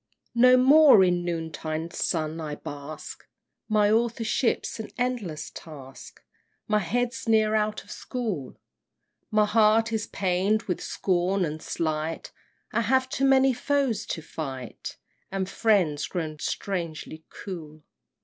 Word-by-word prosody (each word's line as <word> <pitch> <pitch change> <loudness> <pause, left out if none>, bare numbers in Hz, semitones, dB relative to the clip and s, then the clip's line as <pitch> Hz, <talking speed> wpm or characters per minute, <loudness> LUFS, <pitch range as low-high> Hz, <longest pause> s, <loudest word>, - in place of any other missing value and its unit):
VII. 235 - 0
No 255 0 +8
more 275 -4 +7
in 175 -1 +2
noontide 165 -1 -4
sun 160 0 -1
I 150 -2 -4
bask; 145 +2 -8 0.5
My 210 -1 +3
authorship's 230 +1 0
an 220 - -6
endless 230 - -2
task, 135 -5 -11 0.4
My 210 0 +3
head's 240 +7 -2
ne'er 220 -1 +4
out 215 0 0
of - - -14
school: 215 - -4 0.7
My 215 0 +3
heart 220 +1 +3
is 220 -1 -1
pain'd 195 +3 +1
with 180 - -3
scorn 185 0 0
and 155 0 -5
slight, 155 0 -3 0.4
I 230 0 +1
have 260 +3 +2
too 275 0 0
many 270 -1 +5
foes 270 -2 0
to 160 - -4
fight, 135 -6 -7 0.3
And 190 -1 -2
friends 185 -9 +1
grown 155 -4 -4
strangely 165 -4 -4
cool! 155 -5 -8
195 Hz, 130 wpm, -26 LUFS, 160-230 Hz, 0.7 s, No